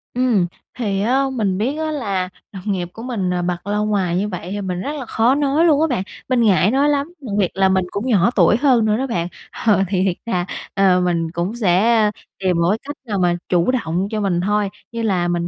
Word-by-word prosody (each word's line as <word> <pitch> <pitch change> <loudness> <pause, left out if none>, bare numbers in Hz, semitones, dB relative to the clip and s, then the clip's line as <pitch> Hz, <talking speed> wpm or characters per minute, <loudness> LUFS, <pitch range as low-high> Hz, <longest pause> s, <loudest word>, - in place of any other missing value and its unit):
Ừm, 240 -8 +2 0.3
thì 200 -4 -1
á 255 +6 +2
mình 205 -7 0
biết 255 +9 -1
á 315 0 -2
là 200 -11 -2 0.2
đồng 190 -4 -9
nghiệp 180 -3 -2
của 225 - -9
mình, 225 -8 -2
ờ, 180 0 0
bật 175 +1 -3
loa 205 +1 0
ngoài 200 -5 0
như 200 +3 0
vậy 180 -3 -6
thì 205 0 -3
mình 185 -2 -3
rất 285 - -3
là 275 -4 -5
khó 230 +3 +2
nói 290 +3 +2
luôn 305 -3 +4
á 320 - +3
bạn. 245 -10 -1 0.3
Mình 255 -2 +2
ngại 200 -2 +4
nói 280 +3 +3
lắm, 290 +3 -1
đặc 240 -7 -6
biệt 190 -4 +2
là 190 +1 +3
mình 190 -1 +2
cũng 205 +5 -3
nhỏ 215 -2 +3
tuổi 190 +2 +5
hơn 250 -4 +3
nữa 215 0 +2
đó 265 +2 -1
bạn. 175 -8 -1 0.4
Ờ, 205 -4 +4
thì 185 0 0
thiệt 190 -2 +1
ra, 180 -6 -1 0.3
ờ, 190 -2 +3
mình 170 -2 0
cũng 175 +6 -3
sẽ, 215 +1 +3
ơ, 210 - +1 0.3
tìm 185 -2 +1
một 170 - +3
cái 210 - +2
cách 290 - -5
nào 205 -4 -2
mà 175 -1 +2
chủ 175 +5 +3
động 185 -6 -1
cho 215 -1 -1
mình 180 -4 0
thôi. 205 +1 +1 0.2
Như 230 -1 -4
là 185 -6 +1
mình 175 0 -1
205 Hz, 250 wpm, -20 LUFS, 180-240 Hz, 0.4 s, tuổi